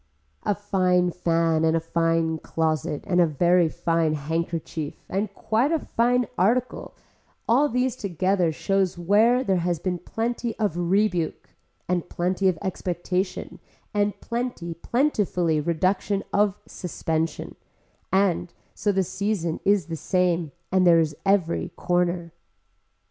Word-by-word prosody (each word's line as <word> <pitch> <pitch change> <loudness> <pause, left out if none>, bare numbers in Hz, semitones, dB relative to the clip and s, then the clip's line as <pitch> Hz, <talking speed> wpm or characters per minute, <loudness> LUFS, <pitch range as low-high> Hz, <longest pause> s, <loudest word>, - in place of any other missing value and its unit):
A 205 - +2
fine 180 -3 +1
fan 165 -2 +1
and 160 0 +3
a - - +1
fine 165 0 0
closet 155 -3 -1
and 180 -2 +3
a 170 - +5
very 170 +3 +3
fine 165 -1 0
handkerchief 160 0 -3
and 200 +2 -2
quite 235 +7 +1
a 330 - +3
fine 245 -3 +1
article 240 +7 0 0.5
all 275 +6 +4
these 250 0 0
together 185 -2 0
shows 190 +3 0
where 215 +8 +3
there 195 -6 +1
has 175 0 0
been 180 +2 -2
plenty 230 +4 -3
of 210 -7 0
rebuke 175 -1 0 0.4
and 175 -1 -1
plenty 185 +2 0
of 180 -3 +2
expectation 185 0 -3 0.3
and 205 0 0
plenty, 235 -8 -3
plentifully 180 - 0
reduction 185 +5 0
of 205 -1 +2
suspension, 165 -2 -3 0.6
and 190 -2 +1 0.2
so 205 - 0
the 190 -1 +1
season 185 -3 -2
is 200 -4 +3
the 165 - -5
same 175 -1 0 0.2
and 185 -1 +4
there 170 -1 +7
is 155 -2 0
every 190 -4 +2
corner. 175 -1 0
180 Hz, 130 wpm, -25 LUFS, 165-205 Hz, 0.6 s, there